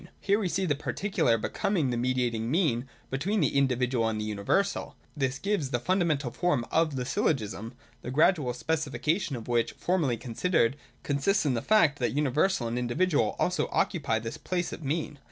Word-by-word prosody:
Here 205 +1 +2
we 195 -4 -1
see 190 +2 0
the 155 - +2
particular 145 - 0
becoming 150 - 0
the - - -1
mediating 120 -2 0
mean 135 -6 +1 0.2
between 180 +11 0
the 145 -4 +1
individual 125 -3 +2
and 110 -1 -2
the 105 - -2
universal. 110 - -1 0.2
This 135 -2 -1
gives 195 -6 -1
the 120 - 0
fundamental 155 -4 0
form 145 -5 0
of 160 -3 +2
the 125 -1 -2
Syllogism, 115 -4 -1 0.3
the - - -6
gradual 145 -1 +3
specifica 155 - -1
tion 140 - -3
of 115 -2 -7
which, 120 -1 +1
formally 160 -10 0
considered, 125 +1 +1 0.3
consists 155 +7 +1
in 140 - +2
the 115 - -1
fact 165 - +3
that 120 - 0
universal 150 0 +1
and 120 +2 -2
individual 125 0 +1
also 180 - 0
occupy 140 -10 +1
this 115 +6 -5
place 175 +3 -2
of - - -8
mean. 150 0 -2
140 Hz, 175 wpm, -28 LUFS, 120-175 Hz, 0.3 s, gradual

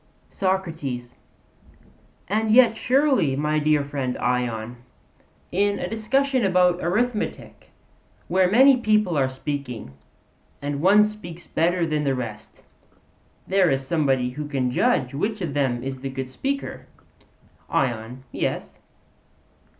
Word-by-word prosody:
SOCRATES: 160 -11 -2 1.1
And 220 +3 0
yet 235 0 +6
surely, 255 - +2
my 150 +2 0
dear 150 -1 +2
friend 140 -3 -3
Ion, 120 -1 -2 0.7
in 200 +2 +1
a - - -3
discussion 255 +4 0
about 180 -2 +3
arithmetic, 215 +6 -2 0.6
where 185 -1 +3
many 260 +6 +6
people 215 -6 +2
are 135 -2 +2
speaking, 130 - -5 0.7
and 145 0 -3
one 200 +4 +6
speaks 205 -5 -6
better 175 +1 +1
than 155 -2 -1
the 135 -2 +1
rest, 115 -4 -7 0.8
there 190 -2 +3
is 135 0 0
somebody 135 -5 +1
who 150 +3 -6
can 130 -4 -1
judge 125 0 +1
which 205 +10 -2
of 170 -7 -3
them 130 -4 0
is 135 0 -5
the 135 +1 -5
good 130 -1 -5
speaker? 275 - -4 0.8
ION: 120 0 -2
Yes. - - -3
155 Hz, 120 wpm, -24 LUFS, 130-205 Hz, 1.1 s, yet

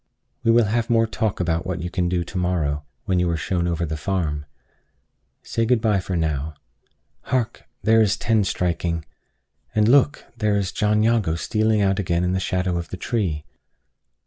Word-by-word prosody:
We 115 - +2
will 115 0 +5
have 115 +3 0
more 115 -1 +4
talk 110 -2 -2
about 85 -1 0
what 90 -2 -3
you 90 - -4
can 90 -2 0
do 90 -1 0
to 95 - -7
morrow, 75 -5 -1 0.2
when 95 -3 +1
you 90 -1 +1
are 85 - 0
shown 85 +2 -1
over 85 0 -1
the 80 0 -3
farm. 75 -3 -2 1.0
Say 115 - -1
good 120 +1 +3
by 105 -4 +2
now. 80 -4 -1 0.7
Hark! 120 -3 -1 0.2
there 115 0 +5
is 110 0 +2
ten 110 -2 +2
striking! 85 -3 -1 0.7
And 105 0 +4
look! 140 +4 +4 0.2
here 105 -1 +2
is 100 -2 0
John 105 0 +2
Jago 110 -8 +2
stealing 110 +4 +1
out 95 0 +2
again 85 -2 0
in 90 0 +1
the 95 - +1
shadow 90 -1 -1
of 85 - -7
the 95 - -6
tree! 90 -9 -2
95 Hz, 180 wpm, -23 LUFS, 85-110 Hz, 1.0 s, will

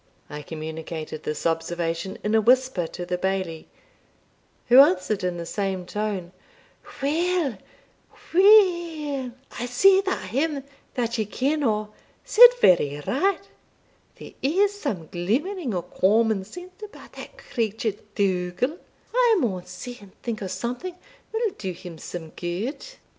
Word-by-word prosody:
I 150 0 -6
communicated 155 0 -6
this 150 -1 -4
observation 165 +2 -2
in 210 - 0
a 220 - +5
whisper 250 -6 +3
to 175 +2 -7
the 180 0 -2
Bailie, 190 -4 -2 1.0
who 245 +2 +7
answered 195 -5 +4
in 180 -1 -1
the 170 - -5
same 190 +1 -2
tone, 200 -3 -3 0.7
"Weel, 315 - 0 0.7
weel, 345 - +4 0.3
I 245 - -2
see 380 +11 +5
that 385 - -3
him 280 +2 -1 0.3
that 235 -2 -1
ye 215 - +1
ken 275 +9 -1
o' 215 -3 0 0.3
said 485 +2 +9
very 145 - +4
right; 390 +7 0 0.7
there - - -11
is 385 +9 +2
some 280 - -4
glimmering 240 - -2
o' 175 - -2
common 205 +3 +2
sense 360 - -12
about 425 -1 -11
that - - -10
creature 220 -1 -2 0.2
Dougal; 190 - 0 0.3
I 480 -3 +4
maun 185 - -2
see 245 +7 -8
and 200 -2 -17
think 230 -3 -3
o' 195 - -3
something 250 - -4 0.4
will 445 -1 0
do 190 -3 -3
him 175 -2 -10
some 165 -1 -7
gude." 180 - -4
215 Hz, 135 wpm, -24 LUFS, 180-300 Hz, 1.0 s, said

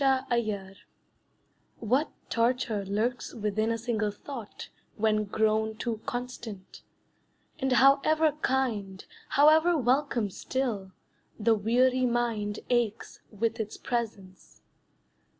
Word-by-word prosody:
A 270 -1 +5
Fixed - - -13
Idea 210 -5 -1 1.1
What 255 +7 +1 0.2
torture 230 -3 +1
lurks 220 +5 -2
within 215 0 -1
a 230 - 0
single 225 -2 -1
thought 225 +1 -8 0.3
When 215 0 +2
grown 220 +1 0
too 225 -1 -3
constant, 245 -5 -6 0.8
and 265 -2 0
however 285 +5 +5
kind, 215 -8 -1 0.2
However 315 +4 +5
welcome 250 -5 +1
still, 220 -5 -3 0.5
the 225 +1 +4
weary 250 +4 +2
mind 230 -4 -1
Aches 235 -3 -1
with 225 +2 -2
its 215 -1 -4
presence. 215 -6 -5
230 Hz, 105 wpm, -28 LUFS, 210-255 Hz, 1.1 s, A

